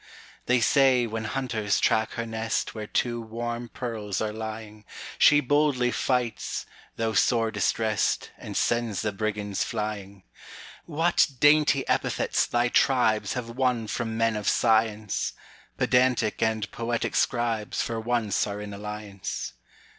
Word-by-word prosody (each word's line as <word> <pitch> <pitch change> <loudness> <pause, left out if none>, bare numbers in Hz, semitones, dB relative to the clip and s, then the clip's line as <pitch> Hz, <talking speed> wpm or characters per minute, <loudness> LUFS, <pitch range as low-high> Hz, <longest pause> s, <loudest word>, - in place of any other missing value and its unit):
They 125 0 +4
say, 130 0 +4
when 110 -1 -4
hunters 110 -4 -1
track 110 0 +2
her 115 - -3
nestWhere 110 -1 -3
two 120 -1 0
warm 120 +1 -5
pearls 110 -6 -4
are 110 -1 -2
lying, 110 -1 -7 0.4
She 145 0 +6
boldly 145 -3 +2
fights, 125 -4 -1 0.3
though 115 -1 -1
sore 115 +1 +2
distrest, 110 +1 0
And - - -6
sends 115 -4 0
the 105 - 0
brigands 105 -1 -2
flying. 100 -2 -5 0.6
What 165 +2 +2
dainty 145 -2 +4
epithets - - +1
thy 120 0 +1
tribesHave 120 -2 +1
won 125 -3 0
from 110 +1 -3
men 115 -1 +2
of 105 -1 0
science! 110 -2 +1 0.4
Pedantic 125 -4 +2
and 110 -2 0
poetic 115 0 -2
scribesFor 115 -1 -1
once 115 -4 0
are 100 0 -5
in 105 0 -7
alliance. 105 -1 -6
115 Hz, 125 wpm, -26 LUFS, 105-120 Hz, 0.6 s, She